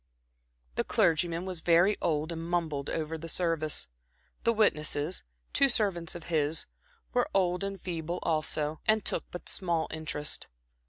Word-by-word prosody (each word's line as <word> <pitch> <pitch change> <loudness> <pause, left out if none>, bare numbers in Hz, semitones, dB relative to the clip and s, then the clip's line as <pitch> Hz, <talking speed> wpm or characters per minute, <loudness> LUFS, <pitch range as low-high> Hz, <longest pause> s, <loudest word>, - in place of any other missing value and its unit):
The - - +2
clergyman 170 +2 +2
was 185 -3 -4
very 175 +5 +5
old 155 0 0
and 165 0 -4
mumbled 160 -5 -1
over 160 0 -2
the 165 +1 -5
service; 165 - 0 0.6
the 230 - +4
witnesses, 160 -6 +2 0.3
two 275 - +4
servants 190 -9 0
of 175 - -7
his, 155 -2 +1 0.5
were 245 0 +2
old 180 -1 +2
and 195 -1 -3
feeble, 170 -1 -3
also, 155 -1 0
and 215 -1 +4
took - - +3
but 175 - -8
small 170 -4 0
interest. 155 -2 -2
170 Hz, 145 wpm, -30 LUFS, 155-180 Hz, 0.6 s, very